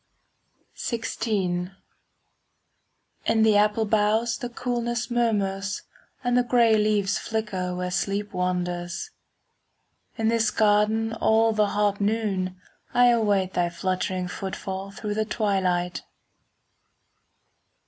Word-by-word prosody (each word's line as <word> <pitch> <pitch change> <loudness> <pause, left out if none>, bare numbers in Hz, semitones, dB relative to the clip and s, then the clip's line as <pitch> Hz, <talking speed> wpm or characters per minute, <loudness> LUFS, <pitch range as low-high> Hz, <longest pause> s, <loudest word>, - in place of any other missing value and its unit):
XVI 200 -6 -2 1.5
In 220 -1 +3
the 220 -1 +5
apple 210 +2 +3
boughs 220 +2 +1
the 245 - -4
coolness 240 0 -2
Murmurs, 200 -4 0 0.4
and 245 0 +1
the 250 - +5
grey 235 -2 +4
leaves 210 -2 +1
flicker 200 -5 -3
Where 180 0 -3
sleep 200 +2 -2
wanders. 180 - -2 1.1
In 225 - 0
this 230 -1 +2
garden 215 +1 +2
all 225 0 +3
the 210 -1 +2
hot 205 0 0
noon 200 -4 -1 0.4
I 245 0 +6
await 205 -5 +2
thy 175 -1 +1
fluttering 185 +1 -2
footfall 190 +1 -5
5 200 - -12
Through 210 -1 -2
the 215 +1 0
twilight. 185 -5 0
210 Hz, 105 wpm, -25 LUFS, 190-225 Hz, 1.5 s, I